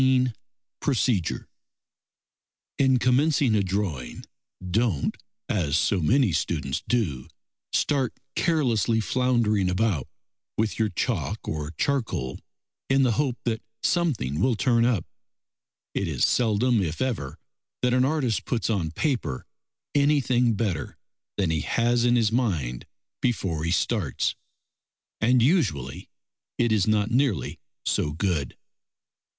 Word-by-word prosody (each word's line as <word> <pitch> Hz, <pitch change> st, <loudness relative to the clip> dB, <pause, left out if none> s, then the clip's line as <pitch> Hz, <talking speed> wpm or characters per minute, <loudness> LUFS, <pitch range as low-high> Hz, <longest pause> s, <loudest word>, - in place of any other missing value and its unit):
XIX 130 Hz, -1 st, +4 dB, 0.5 s
PROCEDURE 120 Hz, -, 0 dB, 1.3 s
In 130 Hz, -2 st, +4 dB
commencing 130 Hz, 0 st, +3 dB
a 105 Hz, -, +3 dB
drawing, 90 Hz, -11 st, -3 dB, 0.4 s
don't, 105 Hz, -, 0 dB, 0.3 s
as 80 Hz, -7 st, +1 dB
so 90 Hz, +3 st, +2 dB
many 120 Hz, -, +3 dB
students -, -, -1 dB
do, 85 Hz, -, 0 dB, 0.4 s
start 135 Hz, -4 st, +1 dB, 0.2 s
carelessly 120 Hz, -, +2 dB
floundering 115 Hz, -5 st, +1 dB
about 90 Hz, -, 0 dB, 0.5 s
with 110 Hz, +1 st, 0 dB
your 110 Hz, -1 st, +2 dB
chalk 90 Hz, -, -2 dB
or 75 Hz, -1 st, -3 dB
charcoal 115 Hz, -, -1 dB, 0.5 s
in 135 Hz, 0 st, +4 dB
the 125 Hz, -, +3 dB
hope 130 Hz, 0 st, 0 dB
that 115 Hz, -2 st, -1 dB, 0.2 s
something 120 Hz, -, 0 dB
will 130 Hz, -2 st, +3 dB
turn 115 Hz, 0 st, +3 dB
up. 120 Hz, -8 st, +1 dB, 0.9 s
It -, -, -1 dB
is -, -, +1 dB
seldom 115 Hz, 0 st, +2 dB
if 80 Hz, -3 st, -3 dB
ever 115 Hz, -, -2 dB, 0.5 s
that 125 Hz, 0 st, +3 dB
an 125 Hz, 0 st, +4 dB
artist 130 Hz, -, 0 dB
puts 115 Hz, -2 st, -1 dB
on 90 Hz, -7 st, 0 dB
paper 85 Hz, -, -2 dB, 0.5 s
anything 130 Hz, -5 st, +3 dB
better 95 Hz, -, -2 dB, 0.4 s
than 95 Hz, -5 st, +1 dB
he 80 Hz, -, 0 dB
has 120 Hz, 0 st, +1 dB
in 120 Hz, 0 st, +4 dB
his 115 Hz, -3 st, +3 dB
mind 85 Hz, -, -1 dB, 0.3 s
before 95 Hz, -10 st, -1 dB
he -, -, 0 dB
starts, 90 Hz, -, 0 dB, 0.9 s
and 120 Hz, +2 st, +4 dB
usually 90 Hz, -, 0 dB, 0.5 s
it 120 Hz, -1 st, +2 dB
is 105 Hz, -3 st, +2 dB
not 110 Hz, 0 st, +2 dB
nearly 120 Hz, -, 0 dB, 0.3 s
so 75 Hz, -, 0 dB
good. 80 Hz, -5 st, -1 dB
115 Hz, 120 wpm, -25 LUFS, 90-125 Hz, 1.3 s, XIX